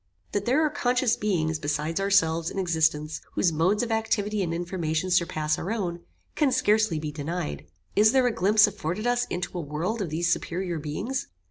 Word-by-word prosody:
That 205 0 -1
there 285 +6 +3
are 300 - 0
conscious 250 -3 +1
beings, 165 -8 0
beside 150 +3 -1
ourselves, 165 -5 +2
in - - -8
existence, 160 -4 0
whose 175 - +2
modes 180 +8 +2
of 235 - -3
activity 215 -2 0
and 175 -3 -1
information 170 0 -2
surpass 155 -3 +1
our 190 - -3
own, 180 -6 -2 0.3
can 295 -4 +2
scarcely 215 -7 +2
be 155 0 -4
denied. 145 - -4 0.3
Is 215 +1 +6
there 260 -1 +3
a 245 - +2
glimpse 210 +3 +5
afforded 200 0 -3
us 245 0 +2
into 175 +1 -4
a - - -2
world 165 +9 -3
of 185 - -2
these 170 +3 +1
superior 175 -1 -3
beings? 195 - -3
180 Hz, 185 wpm, -26 LUFS, 160-215 Hz, 0.3 s, Is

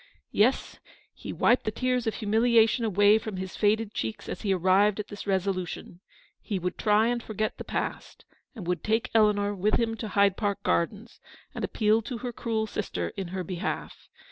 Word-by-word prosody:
Yes 235 +6 +1 0.2
— - - -33
he - - -4
wiped 245 - +3
the - - -1
tears 250 +2 -1
of 220 - 0
humiliation 225 +2 +3
away 205 +1 +5
from 215 -3 -6
his 185 0 -5
faded 215 0 +1
cheeks 110 -1 -4
as - - -5
he 205 - 0
arrived 190 +3 +3
at 210 - -5
this 205 0 -8
resolution 185 -2 -2 0.2
— - - -31
he 200 - -3
would 180 0 -3
try 210 +1 +4
and 240 0 0
forget 215 -1 -3
the - - -4
past, - - -5 0.3
and 210 -7 -7
would 175 -2 -2
take 220 +1 0
Eleanor 210 -2 +3
with 205 +2 +1
him 230 -1 0
to 220 - -5
Hyde 200 -1 +3
Park 205 -3 -2
Gardens, 205 +7 -1 0.3
and - - -5
appeal 215 0 +2
to 240 +2 -5
her 245 +1 -5
cruel 220 -1 -1
sister 90 - -3
in 190 - -6
her 185 +1 -4
behalf. 180 0 -5
210 Hz, 195 wpm, -27 LUFS, 190-225 Hz, 0.3 s, away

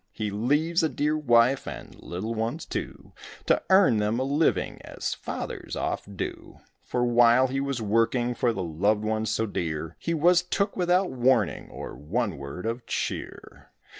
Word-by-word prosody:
He 105 -2 -3
leaves 150 - +1
a 160 - +2
dear 150 +1 0
wife 125 -3 +3
and - - -7
little 95 +7 -4
ones, 115 +8 -3
too, - - -6 0.3
To - - +3
earn 190 - +6
them 105 +2 0
a - - +1
living, 140 - 0
as - - -4
fathers - - -6
oft 100 -1 -4
do; - - -6 0.2
For 125 0 -1
while 120 +1 +5
he 135 +1 -1
was 135 -4 -2
working 115 +3 +1
for 120 0 +1
the 95 -5 -3
loved 100 +6 +1
ones 110 0 -1
so 110 +1 0
dear 80 -6 -3
He 170 - -1
was 175 +3 +4
took 200 +3 -1
without 180 +1 +2
warning 125 - +1
or - - -7
one 100 - -2
word 70 +8 -7
of 115 +2 -3
cheer. - - -5
120 Hz, 165 wpm, -26 LUFS, 105-140 Hz, 0.3 s, earn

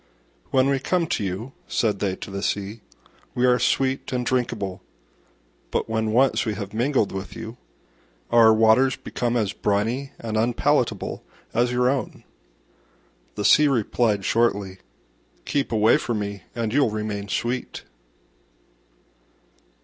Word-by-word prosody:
"When 130 0 +3
we 140 -1 +1
come 175 +5 0
to 110 - -2
you," 100 +7 -4 0.2
said 105 -4 0
they 95 -2 -1
to - - -9
the 100 0 -4
Sea, 105 +2 -3 0.5
"we 125 - +2
are 125 0 +4
sweet 130 +2 0
and 125 -1 -1
drinkable: 105 -7 -2 0.9
but - - -1
when 110 -1 -1
once 130 +4 +3
we 110 -3 -2
have 100 -1 -6
mingled 120 -1 +1
with 95 0 -6
you, 115 +1 -8 0.7
our 115 -1 +7
waters 110 +4 +4
become 120 0 -2
as 105 -4 0
briny 115 +7 -1
and 110 -1 -4
unpalatable 115 +2 0 0.3
as 120 +2 +2
your 125 0 +2
own." 135 0 -2 1.1
The 105 - -3
Sea 150 +8 +6
replied 115 -5 +1
shortly, 100 -5 +1 0.7
"Keep 140 -4 -1
away 110 0 +4
from 120 - -2
me 100 -3 -5
and 115 -2 -2
you'll 140 -3 +3
remain 105 -1 -4
sweet." 120 +5 -3
115 Hz, 135 wpm, -24 LUFS, 105-125 Hz, 1.1 s, our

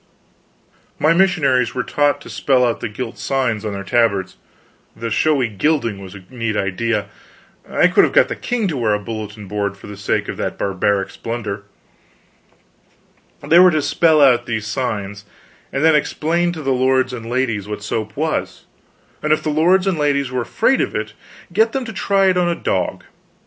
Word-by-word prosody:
My 155 +3 +3
missionaries 150 -11 +2
were 125 - -1
taught 145 0 +1
to - - -11
spell 130 -3 +2
out 120 - -1
the - - -4
gilt 115 +2 -6
signs 125 -6 -1
on 105 -2 -3
their 100 0 -5
tabards 100 -3 +1 0.6
the 115 0 -5
showy 130 +3 +2
gilding 115 0 0
was 95 0 -10
a 95 - -11
neat 115 -4 -2
idea, 105 +2 -1 0.6
I - - +4
could - - +4
have - - +2
got - - +5
the - - -4
king 235 -4 -2
to 150 - -3
wear 110 -4 +1
a - - -2
bulletin 105 -1 -7
board 100 -1 -3
for - - -14
the 105 - -8
sake 100 - -1
of - - -5
that - - -3
barbaric 100 +1 0
splendor 110 -4 -5 1.8
they 170 - +5
were 185 0 +8
to 155 -3 +1
spell 160 -2 +4
out 125 -3 +4
these 110 -2 -2
signs 105 -4 -3 0.5
and 135 +2 -1
then 160 - +6
explain 170 +3 0
to 160 -3 -7
the 135 -1 +1
lords 130 0 +2
and 115 -2 -7
ladies 120 -5 -1
what 105 -1 -6
soap 110 +1 -4
was; 155 +1 -2 0.6
and 150 - -1
if 155 - +2
the 155 - -1
lords 180 +5 +3
and 190 -5 0
ladies 140 -2 +1
were 130 -1 -1
afraid 115 - +1
of - - -2
it, 110 0 -3 0.4
get 220 +4 +3
them 265 -2 -2
to 225 - -7
try 195 -1 +1
it 185 -1 +3
on 175 -1 +2
a 170 - 0
dog. - - -2
125 Hz, 190 wpm, -19 LUFS, 105-155 Hz, 1.8 s, were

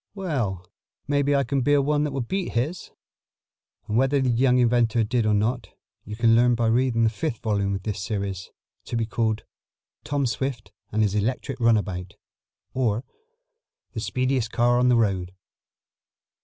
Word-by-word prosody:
"Well, 120 - -2 0.4
maybe 145 0 +2
I 140 - +3
can 140 0 -1
build 145 +1 +3
one 150 0 +1
that 150 - -2
will 135 0 -2
beat 190 +9 -3
his." 145 +9 -2 1.0
And 105 - 0
whether 135 +3 +3
the 130 -2 +1
young 125 +1 +3
inventor 120 -2 +3
did 115 0 0
or 105 - +3
not 115 +5 -1 0.4
you 105 - -6
can 115 0 +4
learn 120 +1 +4
by 115 0 0
reading 120 0 +2
the 110 - +3
fifth 115 +2 -3
volume 100 -2 0
of 95 - -6
this 100 -3 -3
series, 100 -2 -4 0.4
to - - -5
be 115 - 0
called 110 0 -1 0.6
"Tom 145 -1 -1
Swift 125 -2 -3 0.2
and 110 +1 +2
His 100 -2 +1
Electric 125 +5 -2
Runabout; 105 -5 0 0.6
Or, 120 -3 0 0.9
The - - -4
Speediest 130 -3 -1
Car 120 +1 +3
on 125 0 +3
the 125 - +5
Road." 95 -5 0
120 Hz, 165 wpm, -24 LUFS, 105-130 Hz, 1.0 s, the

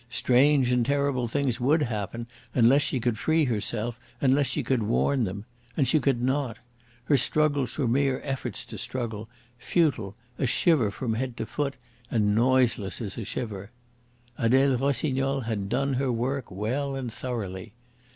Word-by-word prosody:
Strange 130 +2 +3
and 125 -1 +3
terrible 140 -1 0
things 130 0 -1
would 145 +5 +3
happen 115 0 -3 0.3
unless 130 +4 +5
she 130 - 0
could 115 -2 -1
free 160 +2 +2
herself, 115 0 -2 0.2
unless 140 +1 +3
she 150 - -1
could 125 -1 +1
warn 120 +4 +1
them. 100 +2 -5 0.3
And 140 -4 +3
she 155 - +4
could 135 -4 +1
not. 130 -3 0 0.5
Her 140 +3 +3
struggles 145 0 +1
were 140 -5 +1
mere 135 +2 +2
efforts 135 -2 -3
to - - -8
struggle, 115 -3 -4 0.3
futile, 130 - 0 0.2
a 135 - +1
shiver 130 -3 +3
from 110 +3 -3
head 125 +1 -3
to - - -3
foot, 140 +5 -2 0.3
and 105 -3 +2
noiseless 120 -3 +2
as 105 -5 -4
a 115 - -4
shiver. 100 -2 -5 0.7
Adele 130 +3 +4
Rossignol 135 0 0
had 110 -4 -3
done 140 +3 0
her 130 0 0
work 125 +3 -2
well 125 +9 -2
and 125 -4 -4
thoroughly. 105 -5 -5
125 Hz, 160 wpm, -27 LUFS, 115-140 Hz, 0.7 s, unless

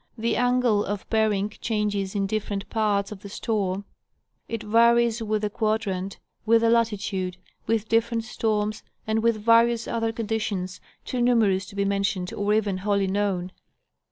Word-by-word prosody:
The 230 +1 0
angle 245 -4 +2
of 205 0 -4
bearing 210 -2 +1
changes 210 -3 -1
in 200 -1 +1
different 205 0 -3
parts 210 -3 +1
of 210 - -7
the 200 - -9
storm, 200 -2 -2 0.6
it 230 -1 -4
varies 235 +1 +4
with 215 -1 -1
the 210 - +1
quadrant, 200 -4 -1 0.3
with 230 +1 +4
the 230 0 +3
latitude, 200 -5 0 0.3
with 220 -1 0
different 230 0 +1
storms, 215 -1 -1 0.2
and 220 0 0
with 230 -1 +2
various 230 0 +4
other 225 -1 -1
conditions, 215 -5 -3 0.2
too 250 - -2
numerous 215 -6 +3
to 200 - -12
be 200 0 0
mentioned 195 -2 -1
or 205 0 -1
even 210 -3 +1
wholly 200 0 +1
known. 190 -2 -1
215 Hz, 155 wpm, -25 LUFS, 200-225 Hz, 0.6 s, varies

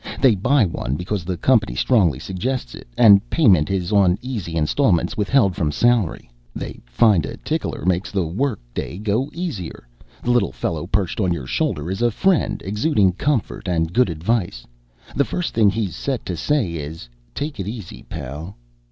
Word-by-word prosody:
They 130 -4 +5
buy 120 +5 +3
one 70 -6 -3
because 90 +2 -3
the 90 -1 -3
company 115 +2 +2
strongly 95 - +3
suggests 105 - -3
it - - -11
and 100 -4 +8
payment 100 - +4
is 95 -1 -1
on 95 -3 +4
easy 110 -10 -5
installments 85 - +1
withheld 105 -2 +2
from 75 -3 0
salary. 120 0 +1 0.3
They - - -6
find 90 - +3
a - - -6
tickler - - -3
makes 90 +1 +1
the 95 -4 0
work 105 - -1
day 85 - -4
go 110 +7 -1
easier. 135 - -6 0.4
The 120 - +1
little 120 - +2
fellow 75 +6 -3
perched 95 -1 -1
on 95 -4 +1
your 80 -7 -3
shoulder 75 +5 -1
is 95 +4 -3
a 120 - +4
friend 190 - +1
exuding 105 - +2
comfort 130 -1 -1
and 80 -1 0
good 125 -3 +3
advice. 85 - -2 0.5
The 140 - +3
first 180 +4 -3
thing 110 -3 +4
he's 100 -2 -2
set 135 -3 -3
to 90 - -3
say 120 - 0
is 75 -3 -7 0.3
'Take 145 -4 -4
it 95 - -3
easy, 105 -5 -7
pal.' 75 +8 -7
100 Hz, 175 wpm, -21 LUFS, 85-120 Hz, 0.5 s, and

